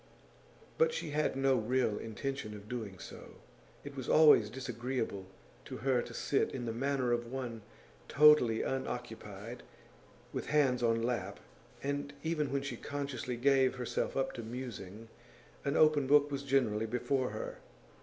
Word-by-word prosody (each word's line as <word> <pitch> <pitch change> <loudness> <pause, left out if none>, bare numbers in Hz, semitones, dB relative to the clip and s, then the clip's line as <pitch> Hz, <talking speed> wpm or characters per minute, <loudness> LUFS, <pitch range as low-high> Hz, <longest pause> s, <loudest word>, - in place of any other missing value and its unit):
But 475 0 +4
she 155 - -4
had 150 -1 0
no 135 0 +3
real 120 -1 +1
intention 115 0 -4
of 105 0 -11
doing 110 -5 -5
so; - - -11 0.5
it 145 -1 -8
was 130 -3 -5
always 150 -9 +7
disagreeable 120 -5 -4 0.4
to - - -6
her 130 -1 +1
to 120 - -8
sit 140 - +1
in 125 -2 -5
the 115 - -2
manner 130 0 0
of 120 0 -1
one 125 -4 -4 0.5
totally 150 -7 +6
unoccupied, 115 -4 -5 0.7
with - - -4
hands 135 -5 +3
on 115 -1 +2
lap, 120 0 -2 0.4
and 140 0 -2
even 155 -4 -1
when 140 0 0
she 140 - -4
consciously 140 -4 -4
gave 135 0 +3
herself 125 +1 -2
up 135 - 0
to - - -6
musing 115 -3 -7 0.6
an 140 +2 0
open 155 -3 +5
book 145 +1 +5
was 140 -1 -2
generally 125 -6 +1
before 125 +3 0
her. 110 +1 -6
125 Hz, 150 wpm, -33 LUFS, 115-140 Hz, 0.7 s, always